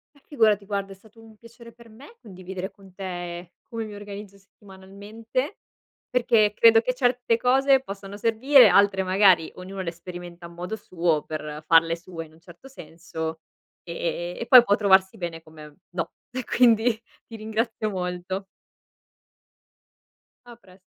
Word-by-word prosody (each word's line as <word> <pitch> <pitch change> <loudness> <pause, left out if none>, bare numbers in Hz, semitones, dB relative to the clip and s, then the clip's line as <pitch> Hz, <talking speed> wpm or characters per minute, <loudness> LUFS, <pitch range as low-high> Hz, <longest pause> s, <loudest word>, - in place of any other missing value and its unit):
Eh 285 - -23
figurati 215 -7 +2
guarda, 200 -1 -4
è - - -9
stato 220 +3 -21
un 220 -1 -17
piacere 235 +1 -15
per 235 0 -18
me 270 - -16
condividere 190 -1 -8
con 195 -2 -19
te 175 -2 -7 0.2
come 225 -1 -5
mi 210 -1 -9
organizzo 205 -1 -10
settimanalmente, 205 - -7 0.5
perché 230 -4 +2
credo 225 0 +6
che 250 +2 -2
certe 245 -2 +1
cose 265 +2 +3
possano 200 -3 -9
servire 230 +3 +5
altre, 195 0 +4
magari, 185 -3 +3
ognuno 190 +1 -7
le 170 -1 -4
sperimenta 175 0 -10
a - - -10
modo 175 +5 -6
suo 170 -6 -1
per 150 -1 -6
farle 165 0 +4
sue 170 -1 -9
in 155 - -21
un 160 - -21
certo 175 +9 -15
senso, 160 -7 -7 0.4
e 170 - -8
e 175 +1 -4
e 235 - -4
poi 250 -2 +9
può 205 - +3
trovarsi 190 -2 +3
bene 165 -2 -6
come 155 -2 -14
no! 175 -2 -4 0.2
E 255 0 -5
quindi, 230 -2 +3 0.4
ti 225 - -10
ringrazio 220 0 -3
molto. 180 +1 -4 2.0
A 240 - -12
prest 190 -4 -21
195 Hz, 155 wpm, -24 LUFS, 175-225 Hz, 2.0 s, poi